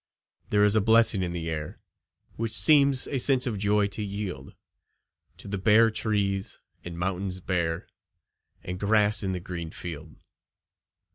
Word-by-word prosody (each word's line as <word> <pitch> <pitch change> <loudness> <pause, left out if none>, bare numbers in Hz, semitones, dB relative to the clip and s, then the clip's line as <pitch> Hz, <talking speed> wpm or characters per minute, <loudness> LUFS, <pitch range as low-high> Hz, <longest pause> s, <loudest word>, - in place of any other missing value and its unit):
There 105 0 +2
is 105 +1 +4
a 110 - +3
blessing 115 -2 +5
in 90 -1 -2
the 85 -1 -5
air, 75 -2 -5 0.6
Which 115 0 -4
seems 140 -1 +4
a 135 - -2
sense 130 0 +2
of 110 -6 -3
joy 105 0 +1
to 105 - -6
yield 100 -9 -6 0.8
To - - -11
the 100 -1 -4
bare 110 +3 +4
trees, 100 -2 -2 0.2
and 85 -1 -8
mountains 95 +1 -3
bare, 85 -3 -2 0.8
And 90 +1 -6
grass 105 +1 +3
in 95 -2 -2
the 90 - -4
green 85 -2 -7
field. 80 -2 -9
100 Hz, 150 wpm, -26 LUFS, 90-110 Hz, 0.8 s, blessing